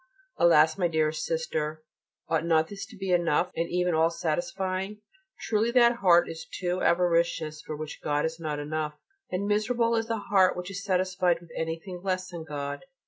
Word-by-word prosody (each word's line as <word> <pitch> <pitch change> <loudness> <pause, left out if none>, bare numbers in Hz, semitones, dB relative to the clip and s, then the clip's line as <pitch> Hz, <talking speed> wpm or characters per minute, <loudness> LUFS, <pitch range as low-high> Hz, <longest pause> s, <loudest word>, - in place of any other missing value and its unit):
Alas! 160 0 +5
my 175 - +3
dearest 155 -1 0
Sister, 155 -1 -2 0.4
ought 160 -1 +1
not 160 -1 +2
this 200 -1 -7
to 220 -2 -14
be 190 -1 -3
enough 175 0 +2
and 170 +1 -1
even 180 0 +1
all 160 +1 +4
satisfying? 185 +5 -2 0.4
Truly 220 +1 +1
that 240 -1 +5
heart 175 -5 +5
is 165 0 -7
too 180 0 -1
avaricious 170 -3 +1
for 155 - -6
which 155 0 -7
God 145 0 +1
is 160 +1 -3
not 155 -2 -3
enough: 150 0 -3 0.3
and 185 +2 -2
miserable 230 +3 +1
is 225 0 0
the 230 -1 -1
heart 195 -3 +3
which 180 +2 -5
is 195 +1 -6
satisfied 185 -2 +1
with 170 -1 -17
anything 165 +3 -4
less 185 -1 -2
than 170 -2 -6
God. 145 -2 -5
175 Hz, 180 wpm, -27 LUFS, 160-190 Hz, 0.4 s, Alas